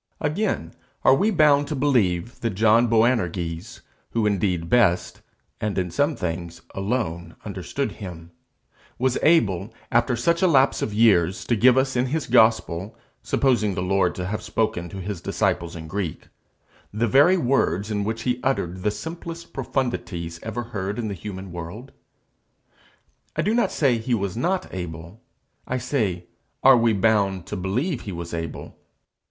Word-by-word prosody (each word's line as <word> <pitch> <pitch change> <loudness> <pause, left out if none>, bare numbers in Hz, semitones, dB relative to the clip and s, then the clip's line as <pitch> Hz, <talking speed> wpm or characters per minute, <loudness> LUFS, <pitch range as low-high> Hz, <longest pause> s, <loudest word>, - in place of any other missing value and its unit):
Again, 150 - -1 0.3
are - - +6
we 195 +11 +3
bound 150 -6 +4
to 150 - -3
believe 120 -8 +1
that 115 -4 -2
John 110 +3 +4
Boanerges, 95 -7 0 0.3
who 115 -2 +1
indeed 95 -5 0
best, 95 -4 +2 0.4
and 105 -1 -2
in 90 -2 -1
some 145 - +1
things 85 -1 -4
alone, 95 -5 -3
understood - - -3
him, 85 -3 -9 0.7
was 130 0 +1
able, 110 - +3 0.2
after 120 +1 +2
such 170 +9 +1
a 185 - +5
lapse 140 -5 +3
of - - -1
years, 100 -5 +3
to 120 - +1
give 125 +4 +5
us 130 0 +1
in 125 +1 +1
his 155 +3 -1
gospel, 110 -5 +2 0.2
supposing 110 -7 +1
the 90 - -2
Lord 90 -1 +1
to 90 - -4
have 105 +3 -3
spoken 105 -5 -1
to 95 - -8
his 95 -2 -5
disciples 85 0 -1
in 80 -1 -7
Greek, 95 -2 -4 0.6
the 110 +3 0
very 145 - +5
words 110 - +1
in 105 -1 0
which 110 +2 -3
he 125 -1 0
uttered 95 -9 -1
the 105 - +1
simplest 165 +10 -7
profundities 85 -10 -3
ever 115 +2 -4
heard 105 -3 -4
in 115 -3 -2
the - - -3
human 95 0 -7
world? 90 +10 -8 1.4
I - - 0
do 210 - +1
not 235 0 +2
say 130 -6 +2
he 120 +2 0
was 100 -2 -3
not 180 +10 0
able; 85 +3 -7 0.5
I 130 - -1
say 105 -10 -1 0.4
Are 135 0 +8
we 115 -1 +3
bound 100 -3 +1
to - - -5
believe 120 - -1
he 100 - -6
was 85 -1 -6
able? 80 -1 -5
105 Hz, 160 wpm, -24 LUFS, 90-125 Hz, 1.4 s, Are